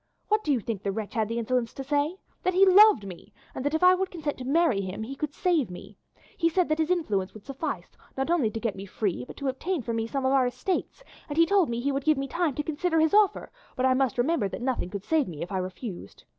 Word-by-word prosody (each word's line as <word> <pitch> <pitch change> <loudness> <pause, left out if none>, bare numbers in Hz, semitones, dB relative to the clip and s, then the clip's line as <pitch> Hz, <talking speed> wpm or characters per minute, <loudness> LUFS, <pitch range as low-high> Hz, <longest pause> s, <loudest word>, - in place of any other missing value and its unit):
What 425 +1 +2
do 300 - 0
you 265 - +2
think 220 -2 -4
the 200 - -1
wretch 215 +2 -5
had 220 -3 0
the 230 - -2
insolence 235 0 -1
to 270 - -5
say? 290 +5 0 0.2
That 370 0 0
he 390 +1 +7
loved 390 - +7
me, 190 +2 -10 0.2
and 255 - -5
that 290 +2 0
if 320 - 0
I 365 0 +8
would 375 0 -1
consent 310 -6 -4
to - - -5
marry 280 -6 +2
him 190 +3 -5
he 265 +5 -6
could 300 +1 -3
save 335 - +1
me. 180 - -10 0.4
He 335 - +3
said 355 0 +1
that 310 +1 +1
his 320 0 +1
influence 210 - 0
would 215 - -12
suffice, 275 +3 -5 0.2
not 270 +5 -1
only 300 -11 +2
to 225 - -5
get 225 -3 -2
me 195 +1 -8
free, 185 - -2
but - - -11
to 280 - -3
obtain 290 +4 -2
for 235 - -3
me 225 0 -1
some 270 +2 -2
of 260 - +3
our 260 -2 +4
estates, 370 - -3 0.3
and 290 - -4
he 330 - +6
told 380 -3 +3
me 235 0 -2
he 280 +4 0
would 275 0 -2
give 310 -2 +4
me 275 0 -2
time 325 -1 -1
to 295 - -2
consider 320 +2 0
his 320 +2 +3
offer, 420 -1 +3 0.2
but 255 - -2
that 260 - +4
I - - +4
must 255 -3 +1
remember 245 -5 +1
that 240 - -6
nothing 250 -8 -1
could 200 0 -6
save 315 0 +1
me 155 -4 -6
if 175 - -8
I 190 - -1
refused. 185 - -7
270 Hz, 280 wpm, -27 LUFS, 225-325 Hz, 0.4 s, I